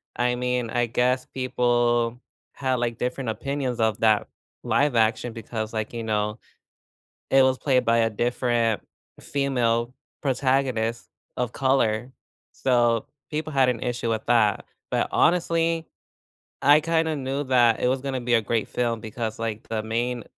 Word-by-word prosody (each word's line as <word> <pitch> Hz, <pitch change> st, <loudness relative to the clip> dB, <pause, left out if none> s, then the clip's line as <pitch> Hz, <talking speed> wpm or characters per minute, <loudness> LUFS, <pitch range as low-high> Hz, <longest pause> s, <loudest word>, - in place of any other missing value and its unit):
I 125 Hz, 0 st, +1 dB
mean, 125 Hz, -1 st, -1 dB
I 120 Hz, +1 st, +1 dB
guess 125 Hz, +2 st, +1 dB
people 120 Hz, -2 st, 0 dB, 0.3 s
had, 130 Hz, -2 st, -1 dB
like, 120 Hz, -2 st, -2 dB
different 125 Hz, 0 st, -3 dB
opinions 135 Hz, +1 st, -3 dB
of 110 Hz, -1 st, +1 dB
that 110 Hz, -2 st, +3 dB, 0.4 s
live 145 Hz, -3 st, +2 dB
action 115 Hz, +1 st, +1 dB
because, 110 Hz, -1 st, -5 dB
like, 110 Hz, 0 st, -3 dB
you 115 Hz, -1 st, -4 dB
know, 105 Hz, 0 st, -1 dB, 0.9 s
it 135 Hz, 0 st, +6 dB
was 130 Hz, 0 st, +2 dB
played 130 Hz, -3 st, +2 dB
by 115 Hz, 0 st, +3 dB
a 115 Hz, -1 st, +2 dB
different 120 Hz, 0 st, 0 dB, 0.4 s
female 125 Hz, -4 st, 0 dB, 0.3 s
protagonist 130 Hz, -4 st, 0 dB, 0.3 s
of 125 Hz, -1 st, -2 dB
color, 130 Hz, -3 st, +1 dB, 0.4 s
so 120 Hz, -3 st, +2 dB, 0.2 s
people 155 Hz, +1 st, -3 dB
had 135 Hz, -2 st, +3 dB
an 120 Hz, -3 st, 0 dB
issue 120 Hz, -2 st, -2 dB
with 110 Hz, -1 st, -2 dB
that. 115 Hz, -4 st, +2 dB, 0.2 s
But -, -, 0 dB
honestly, 165 Hz, -1 st, +2 dB, 0.8 s
I 145 Hz, +2 st, +6 dB
kinda 160 Hz, 0 st, 0 dB
knew 135 Hz, +1 st, -2 dB
that 120 Hz, -4 st, +3 dB
it 125 Hz, -, +2 dB
was 130 Hz, +1 st, 0 dB
gonna 130 Hz, -1 st, -3 dB
be 120 Hz, 0 st, 0 dB
a 115 Hz, -, +5 dB
great 110 Hz, 0 st, -1 dB
film 120 Hz, -2 st, -1 dB
because 110 Hz, 0 st, -5 dB
like 110 Hz, -1 st, -4 dB
the 110 Hz, -1 st, -2 dB
main, 120 Hz, +2 st, -2 dB
120 Hz, 150 wpm, -25 LUFS, 115-130 Hz, 0.9 s, it